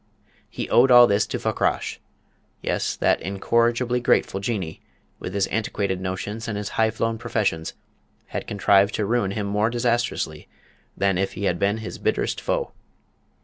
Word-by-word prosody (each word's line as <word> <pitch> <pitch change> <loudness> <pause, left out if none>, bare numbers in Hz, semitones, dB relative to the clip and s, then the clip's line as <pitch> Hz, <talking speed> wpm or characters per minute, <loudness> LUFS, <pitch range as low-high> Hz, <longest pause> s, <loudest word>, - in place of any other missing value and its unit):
He - - -5
owed 125 +3 +6
all 120 -1 +9
this 100 -2 +2
to - - -3
Fakrash. - - -1 0.6
Yes, - - -1
that - - +2
incorrigibly 115 +6 +1
grateful 110 -4 +1
Jinnee, 100 -6 -3 0.4
with 90 - -6
his 100 -1 +2
antiquated 100 -4 -1
notions 100 +5 -4
and 105 -2 -3
his 105 0 -4
high 110 0 +2
flown 115 0 -2
professions, 105 -9 -1 0.5
had - - -5
contrived 100 0 +3
to 105 - 0
ruin 115 -2 +1
him 100 +1 -3
more 105 +2 +1
disastrously 120 -9 -1 0.5
than 95 -2 +1
if 95 - -1
he 100 - -6
had 90 -3 0
been 100 +2 +1
his 110 - -7
bitterest - - -1
foe! - - -1
105 Hz, 155 wpm, -24 LUFS, 95-115 Hz, 0.6 s, all